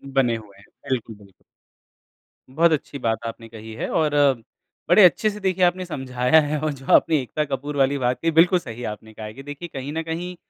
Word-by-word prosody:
बने 120 -4 +3
हुए 100 -3 -15
हैं। - - -18 0.2
बिल्कुल, 115 -4 -2
बिल्कुल। 100 -2 -20 1.1
बहुत 165 +5 +3
अच्छी 145 -2 -2
बात 115 -1 -1
आपने 115 0 -8
कही 110 0 -10
है - - -4
और 155 -2 +1 0.8
बड़े 185 +3 +7
अच्छे 180 +6 +3
से 210 0 -7
देखिए 190 -2 0
आपने 180 +1 0
समझाया 130 -2 +2
है 150 0 -2
और 155 -1 0
जो 135 -1 -13
आपने 155 -2 +5
एकता 150 +5 -2
कपूर 145 +1 -4
वाली 140 +1 +2
बात 125 -1 0
कही, 165 0 +1
बिल्कुल 175 +3 +5
सही 120 -5 -8
आपने 110 0 -7
कहा 110 0 -8
है 105 - -8
कि 135 +3 -11
देखिए, 145 +4 -7
कहीं 135 +1 -5
न 165 - -2
कहीं 170 +3 -5
140 Hz, 210 wpm, -23 LUFS, 115-165 Hz, 1.1 s, बड़े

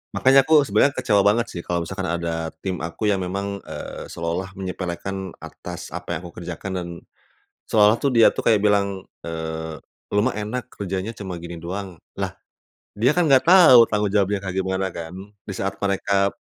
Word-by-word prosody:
Makannya 135 +1 +6
aku 150 -1 +4
sebenernya 110 +7 +4
kecewa 120 -7 +2
banget 110 +3 +3
sih, 85 - -6
kalau 85 0 -1
misalkan 95 +1 -4
ada 80 -1 -3
tim 95 +2 -3
aku 85 +6 -3
yang 100 -2 +1
memang, 100 +2 -4
eee, - - -8
seolah-olah 85 +3 -3
menyepelekan 95 +1 -4
atas 90 -1 -8
apa 90 +2 -7
yang 85 - -1
aku 85 - -15
kerjakan 90 +2 -6
dan 90 -1 -3 0.8
seolah-olah 105 +1 +4
dia 115 -3 +5
tuh - - -3
kayak 115 -2 +4
bilang, 100 -2 +1 0.2
eee, 80 -1 -5 0.3
"Lu 105 +2 +2
mah 130 - +1
enak, 110 +4 -5
kerjanya 95 +2 -4
cuma 95 -5 -6
gini 85 0 -8
doang", 90 0 -6 0.2
lah, - - -2 0.6
dia 125 +9 +2
kan 175 - +4
enggak 135 0 +4
tahu 155 -11 +8
tanggung 105 -2 0
jawabnya 100 -1 +2
kayak 95 0 -4
gimana 95 0 -1
kan, 85 +1 -7 0.3
disaat 95 0 -3
mereka, 100 0 +1
95 Hz, 170 wpm, -23 LUFS, 90-105 Hz, 0.8 s, tahu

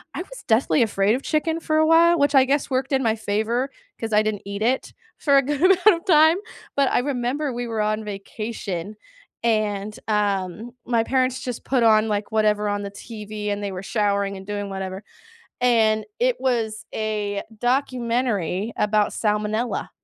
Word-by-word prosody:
I - - -3
was - - -10
deathly 240 +3 +3
afraid 205 -2 +2
of 260 +3 -2
chicken 320 +1 0
for 310 -1 -1
a 315 - +4
while, 335 +1 +5
which 285 0 +2
I 265 -1 +7
guess 280 +2 0
worked 265 +1 -1
in 265 -1 +2
my 220 -1 +2
favor, 220 +5 -1 0.3
'cause 225 -1 -4
I 210 - +5
didn't 215 -2 -2
eat 200 +1 -5
it 250 +4 0 0.2
for 280 -2 +2
a - - +6
good 290 +1 -2
amount 370 0 +4
of 335 - -25
time, 320 -1 +6 0.4
but 280 -1 +3
I - - +3
remember 265 +2 -1
we 240 0 -4
were 225 -2 -2
on 215 +1 -1
vacation 205 -2 -5 0.5
and, 215 -2 0
um, 205 +1 -1
my 230 -2 +1
parents 255 0 0
just 250 -2 -5
put 255 -3 +1
on, 220 -1 +5
like, 205 0 -2
whatever 210 -1 +2
on 205 0 -2
the 200 - -6
TV 210 0 -7
and 205 0 -2
they 200 -1 -3
were 185 - -6
showering 200 -1 0
and 190 - -10
doing 205 -1 -4
whatever, 190 0 -5 0.6
and 220 -3 +3
it - - +1
was 230 -4 -1
a 210 -2 -2 0.2
documentary 240 - 0
about 210 0 +2
salmonella. 215 +2 -1
220 Hz, 180 wpm, -23 LUFS, 210-260 Hz, 0.6 s, I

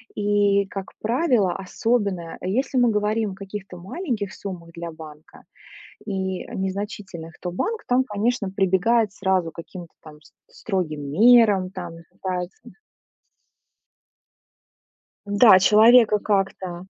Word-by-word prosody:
И 205 -1 +2
как 195 -1 -7
правило, 235 - +1
особенно 195 -3 -2
если 255 +7 -1
мы 245 -1 +4
говорим 210 0 0
о - - -9
каких-то 195 -2 -8
маленьких 210 - -4
суммах 175 -4 -8
для 170 0 -7
банка, 155 -1 -13 0.6
и 190 -2 -3
незначительных, 190 -3 -6
то 180 - -5
банк 440 - -3
там, 250 +1 +3
конечно, 215 -1 -1
прибегает 195 +3 +1
сразу 190 -4 0
к - - -38
каким-то 170 0 -10
там 150 -1 -14
с - - -22 0.3
строгим 155 -8 -3
мерам, 210 -1 +5
там 180 -3 -7 0.2
пытается 180 -1 -5 2.7
Да, 205 -1 +6
человека 215 +2 +6
как-то 190 -3 -2
195 Hz, 115 wpm, -23 LUFS, 180-215 Hz, 2.7 s, Да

